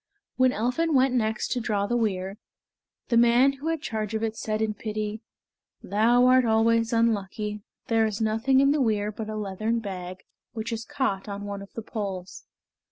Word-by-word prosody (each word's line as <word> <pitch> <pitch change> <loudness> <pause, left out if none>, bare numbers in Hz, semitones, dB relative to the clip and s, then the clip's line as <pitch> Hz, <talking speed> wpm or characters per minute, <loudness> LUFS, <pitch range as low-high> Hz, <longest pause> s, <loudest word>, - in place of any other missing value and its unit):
When 255 0 +4
Elphin 255 +8 0
went 260 0 +4
next 220 -3 0
to 250 - 0
draw 210 -3 0
the 240 - -1
weir, 195 -3 -1 0.7
the 235 - +3
man 240 +3 +5
who 275 +3 -7
had 325 -2 -1
charge 220 -3 -3
of 220 - -2
it 225 -1 -1
said 215 -1 -2
in 220 -1 0
pity, 215 0 -4 0.6
"Thou 235 +4 +3
art 255 0 +6
always 230 0 +2
unlucky; 210 -2 0 0.2
there 225 -1 +2
is 210 -2 -4
nothing 225 +5 +2
in 275 0 +4
the 295 -1 +1
weir 210 -3 +1
but 215 +1 -6
a 215 - -4
leathern 215 +2 -2
bag, 185 -4 -6 0.3
which 225 0 -4
is 225 0 -4
caught 260 -9 -2
on 200 0 -5
one 200 -1 -5
of 200 - -11
the 225 - -6
poles." 195 -5 -6
220 Hz, 185 wpm, -26 LUFS, 210-240 Hz, 0.7 s, art